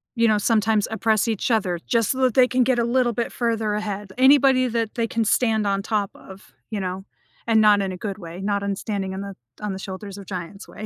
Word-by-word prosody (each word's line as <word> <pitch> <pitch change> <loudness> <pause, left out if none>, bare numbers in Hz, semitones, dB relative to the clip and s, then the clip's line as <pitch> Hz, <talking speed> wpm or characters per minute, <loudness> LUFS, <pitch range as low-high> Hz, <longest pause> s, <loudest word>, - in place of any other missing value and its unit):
you 230 -1 +3
know, 215 -1 +3
sometimes 215 -1 +2
oppress 220 0 +1
each 225 +2 -1
other 190 -6 +1
just 230 -3 +1
so 265 - -3
that 255 -3 +3
they 255 +1 +5
can 255 0 +2
get 250 0 +1
a 235 - +2
little 240 0 +2
bit 235 +1 -3
further 225 -3 -1
ahead. 205 -2 -4
Anybody 265 -1 +5
that 230 -2 -2
they 230 -2 0
can 230 0 -1
stand 220 -2 +2
on 195 0 0
top 205 -1 -1
of, 190 +1 -14 0.2
you 215 -2 -3
know, 185 0 -4 0.4
and 225 -1 +4
not 210 -1 +5
in 195 -1 -2
a 185 - -6
good 200 +1 -5
way, 170 -2 -9
not 200 0 -1
on 200 -1 -2
standing 195 -3 -3
on 190 - -5
the 200 -1 -7 0.3
on 210 -2 -3
the 190 - -6
shoulders 195 +1 -7
of 200 - -10
giants 185 +2 -7
way. 215 - -9
215 Hz, 245 wpm, -23 LUFS, 195-230 Hz, 0.4 s, they